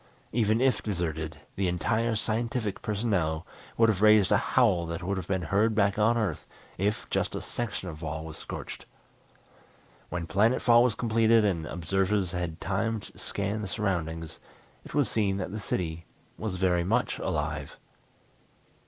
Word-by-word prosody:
Even 110 -1 +2
if 130 -1 +3
deserted, 80 -5 -3 0.2
the 95 -1 0
entire 110 +7 +1
scientific 110 -1 -1
personnel 100 -8 0 0.3
would 115 - +6
have 105 -3 +1
raised 105 -3 +6
a - - +6 0.2
howl 95 -10 +4
that 85 +1 -4
would 100 +2 -1
have 95 -2 -5
been 95 -2 0
heard 105 +5 +2
back 100 0 +2
on 115 +3 +4
Earth 100 -9 -2 0.3
if 105 +2 0
just - - 0
a - - -2
section 115 -5 -4
of 80 -2 -7
wall 80 0 -4
was 80 -1 -8
scorched. - - -7 1.2
When 90 -1 -3
planet 110 +8 +3
fall 120 -1 +6
was 125 -3 +2
completed 115 -1 +3
and 85 -6 0
observers 95 +2 0
had 85 -3 -3
time 110 +3 -1
to - - -13
scan 100 +2 -3
the 105 - -4
surroundings 85 -6 -2 0.4
it - - -10
was 145 -3 +3
seen 100 -3 +1
that 95 -2 -4
the 105 - -4
city 85 -4 -3 0.3
was 105 -4 -4
very 90 -2 +2
much 115 +7 0
alive. 75 -1 -3
100 Hz, 160 wpm, -28 LUFS, 85-110 Hz, 1.2 s, would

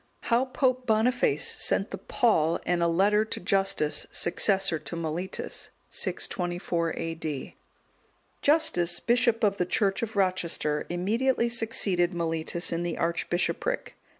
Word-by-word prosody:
How 240 +2 +2
Pope 255 -1 0
Boniface 245 - +2
sent - - +1
the - - -5
Pall 165 -9 +1
and 175 -1 +1
a 170 - +3
letter 200 +5 +3
to - - -4
Justus, 195 -5 +1
successor 190 -1 +2
to 170 - -7
Mellitus. 170 +3 -4 0.2
[624 175 -2 -2
A.D.] 160 -4 -5 0.9
Justus, 175 - +2
bishop 235 -1 +2
of 200 -2 +2
the 180 - +1
church 195 0 +1
of 225 -2 -4
Rochester, 175 -6 0
immediately 230 +8 +1
succeeded 195 -6 +1
Mellitus 165 0 -1
in 165 - -1
the 175 -1 -3
archbishopric. 175 - -1
185 Hz, 125 wpm, -27 LUFS, 170-225 Hz, 0.9 s, a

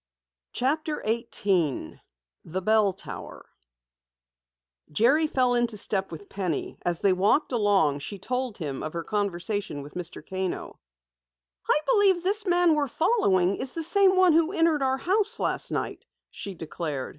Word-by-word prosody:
CHAPTER 300 +4 -1
18 200 - -1 0.4
THE 185 +4 -4
BELL 215 -1 +3
TOWER - - -9 1.5
Jerry 270 - +3
fell 255 -4 +2
into 240 -3 0
step 195 -2 -2
with 170 +5 -9
Penny. 185 -6 -3
As 175 -1 -1
they 195 -2 +4
walked 205 +12 +2
along, 200 - +2
she 200 +8 -6
told 250 +1 -3
him 145 -6 -4
of 155 - -5
her 170 -1 -3
conversation 200 -5 -2
with 145 - -12
Mr. 180 -1 -7
Kano. 190 -1 -4 0.9
"I - - +4
believe 400 -7 +4
this 405 +2 0
man 350 -2 +4
we're 295 -2 +1
following 200 - +2
is 260 - -3
the 330 - -3
same 385 +3 +4
one 370 -3 +5
who 330 +1 +3
entered 330 -5 +2
our 265 0 +1
house 390 +8 0
last - - -1
night," - - -3 0.3
she 200 -2 -7
declared. 155 -4 -5
215 Hz, 145 wpm, -26 LUFS, -, 1.5 s, one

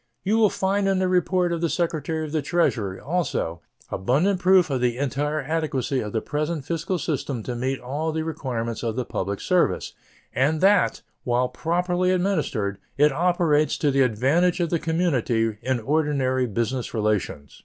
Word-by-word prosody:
You 215 +4 +2
will 215 -2 +5
find 195 +1 0
in 195 -1 +2
the 185 0 +1
report 180 -1 +1
of 165 - -3
the 170 - +1
Secretary 160 -2 -1
of 150 - -7
the 155 -1 0
Treasury, 130 - 0
also, 140 - -2 0.3
abundant 155 - +1
proof 185 -3 +4
of 130 -2 0
the 120 -1 +1
entire 145 +3 -1
adequacy 145 -4 -1
of 105 -3 -4
the 110 - -2
present 150 0 -2
fiscal 170 +3 -2
system 140 -6 -3
to 125 - -4
meet 130 +2 -2
all 145 +6 -3
the 160 0 -2
requirements 120 -7 -3
of 115 -2 -2
the 125 -1 -2
public 100 -2 -3
service, - - +1 0.4
and 150 +4 +1
that, 195 +1 +3 0.2
while 125 +1 +1
properly 175 +6 0
administered, 155 - 0 0.2
it 150 +1 +5
operates 165 -1 +2
to 145 - +1
the 135 0 +2
advantage 135 - +2
of 170 -2 0
the 170 - +1
community 125 - 0
in 130 -1 0
ordinary 135 -1 +1
business 120 +3 -2
relations. 100 - -2
150 Hz, 170 wpm, -24 LUFS, 125-175 Hz, 0.4 s, will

